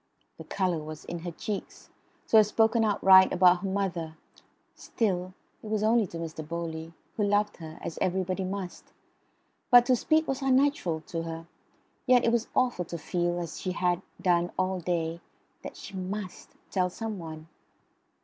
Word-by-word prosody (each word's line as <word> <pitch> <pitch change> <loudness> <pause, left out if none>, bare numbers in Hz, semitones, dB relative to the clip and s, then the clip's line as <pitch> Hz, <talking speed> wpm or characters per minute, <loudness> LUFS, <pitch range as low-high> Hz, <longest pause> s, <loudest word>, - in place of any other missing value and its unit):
The - - -8
colour 185 -4 -1
was 155 0 -8
in 175 - -5
her 175 +1 -5
cheeks. 200 +4 -6 0.4
To 225 - +6
have 215 -1 +7
spoken 225 +1 +3
outright 190 -3 +6
about 180 0 +5
her 195 - -4
mother 175 -5 -2 0.6
still, 185 -4 -2 0.3
it - - -10
was 215 -1 0
only 220 -1 +3
to 170 - -8
Mr. 160 -1 -5
Bowley, 165 0 -5 0.2
who 210 - 0
loved 205 +1 +1
her, 160 -2 -9
as 165 - -5
everybody 185 +1 0
must; 190 -1 -6 0.8
but 245 -1 +8
to 255 0 +4
speak 315 +6 +2
was 270 0 -2
unnatural 265 - +2
to 165 +1 -5
her, 165 0 -6 0.6
yet 250 -1 +5
it 230 - +3
was 235 0 +1
awful 245 -8 +1
to 170 - -6
feel, 175 +2 -1
as 170 -2 -6
she 185 - -2
had 180 -1 0 0.2
done 175 -1 +2
all 185 0 0
day, 170 -1 -2 0.4
that - - -9
she 200 - -10
MUST 190 +1 -6 0.2
tell 185 -2 +1
some 215 +1 -5
one. 160 -1 -8
185 Hz, 170 wpm, -28 LUFS, 170-210 Hz, 0.8 s, but